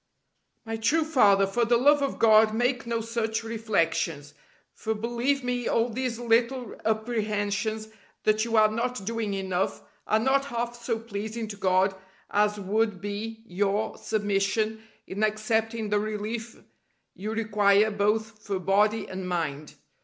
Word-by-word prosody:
My 225 0 -3
true 290 +9 +2
Father, 210 -11 +4
for 195 +5 0
the 235 +1 +3
love 290 +4 +4
of 275 - -1
God 220 -1 +5
make 245 +1 0
no 230 -1 -1
such 225 -1 -2
reflections: 165 -9 -1 0.4
for 220 0 -3
believe 240 +5 -1
me 245 -1 -1
all 230 +1 +2
these 245 0 -2
little 240 0 +1
apprehensions 215 -1 -1 0.4
that 215 0 +3
you 230 0 -1
are 215 0 +5
not 235 -2 -2
doing 225 -2 -2
enough 190 -1 -2 0.2
are 215 - +3
not 265 +4 +2
half 240 -2 -3
so 230 -1 0
pleasing 220 0 -5
to 205 - -6
God 190 0 +2 0.4
as 210 0 +2
would 210 0 0
be 215 +3 -5
your 205 +2 -1
submission 215 +1 0 0.2
in 200 +3 -3
accepting 220 +1 0
the 210 0 +2
relief 215 +2 -4 0.5
you 210 +3 -5
require 210 -1 +3
both 215 +1 0
for 200 -2 -2
body 210 +4 +2
and 185 -1 -5
mind. 155 -4 -3
220 Hz, 145 wpm, -27 LUFS, 205-230 Hz, 0.5 s, God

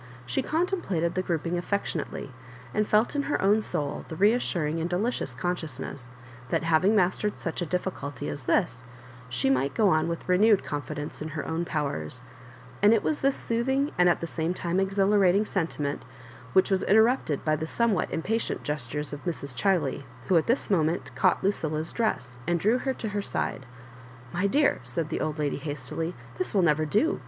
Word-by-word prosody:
She 125 0 0
contemplated 310 - 0
the 185 - 0
grouping 170 0 -1
affectionately, 175 -7 -3 0.4
and 210 0 +1
felt 215 +6 +3
in 285 - +2
her - - +1
own 205 +3 +4
soul 145 -8 -3
the 160 - -6
reassuring 175 -6 +2
and 170 - -1
delicious 180 - -1
con 175 +7 0
sciousness 140 -5 -7 0.4
that, - - 0
having 170 +6 +3
mastered 200 +2 +1
such 165 +1 -3
a 175 - -1
difficulty 150 - -3
as 75 - -5
this, 125 - +1 0.5
she 125 +1 +1
might 135 +1 +1
go 215 -3 +4
on 155 -1 +2
with 170 0 -4
renewed 200 +3 +4
confidence 150 0 -5
in 155 - -3
her 150 - -3
own 165 +1 -1
powers; 125 - -2 0.6
and 210 +3 +7
it 220 - 0
was 310 - 0
this 275 0 +3
soothing, 265 +5 0
and 180 0 +5
at 175 - +1
the - - -1
same 165 +1 -2
time 175 +1 -1
exhilarating, 195 0 +3
sentiment 160 -7 -2 0.5
which 190 - +4
was 190 -1 +3
interrupted 220 - +3
by 155 -1 +3
the 160 +1 -4
somewhat 230 0 +1
impatient 220 +8 -1
gestures 150 +1 -3
of 145 - -7
Mrs. 150 -6 -3
Chiley, 165 -5 +1 0.3
who 185 - +4
at 160 - +3
this 240 -2 +1
moment 165 -2 +1
caught - - +2
Lu> 195 - +4
cilia's 155 -4 -3
dress, 125 - -1
and 175 0 +2
drew 220 +8 +3
her 265 0 -1
to 220 - -4
her 205 0 -2
side. 130 -8 -3 0.6
• - - -17
"My 185 +3 +1
dear," 285 +7 +3
said 130 +6 -3
the 160 - -2
old 155 0 -2
lady, 150 -2 -1
hastily, 150 +3 -4 0.2
"this 370 - -2
will 190 - +4
never 155 -1 +3
do. 255 - +2
175 Hz, 185 wpm, -27 LUFS, 150-205 Hz, 0.6 s, and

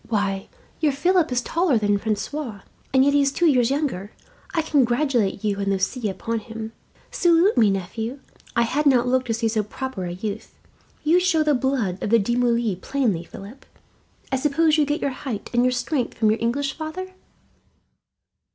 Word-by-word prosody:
Why, 200 -3 -1 0.3
your 300 -3 +2
Philip 350 +2 +2
is 245 -1 +1
taller 330 -4 +1
than 205 -1 +1
Francois, 220 +2 -3 0.3
and 265 0 +4
yet 285 - +3
he 285 - +4
is 275 -1 +2
two 345 - 0
years 255 -7 +4
younger. 265 -9 -2 0.4
I 330 -4 0
congratulate 250 -7 +1
you 205 -2 0
and 200 - -2
Lucie 195 +4 -1
upon 225 +4 -3
him. 225 0 -7 0.4
"Salute 345 +3 +3
me, 220 -4 +5
nephew. 220 +7 -3 0.4
I 235 - +4
had 290 +6 0
not 250 -3 +4
looked 255 0 +1
to 225 - 0
see 230 0 0
so 220 -1 +1
proper 210 -1 -5
a 175 - -4
youth. 205 +4 -6 0.5
You 325 +4 +4
show 360 -4 +2
the 300 -1 +2
blood 250 -8 -1
of - - -2
the 230 - +5
De 230 +3 0
Moulins 235 -5 +1
plainly, 235 -12 0
Philip. 200 +9 -11 0.7
I 265 - +2
suppose 300 +3 +2
you 300 -2 +2
get 295 +2 -1
your 280 - 0
height 250 -5 -6
and 240 - +3
your 250 0 +3
strength 250 +1 -2
from 215 -2 +3
your 220 - 0
English 275 +4 0
father?" 340 +4 -6
245 Hz, 185 wpm, -23 LUFS, 215-285 Hz, 0.7 s, me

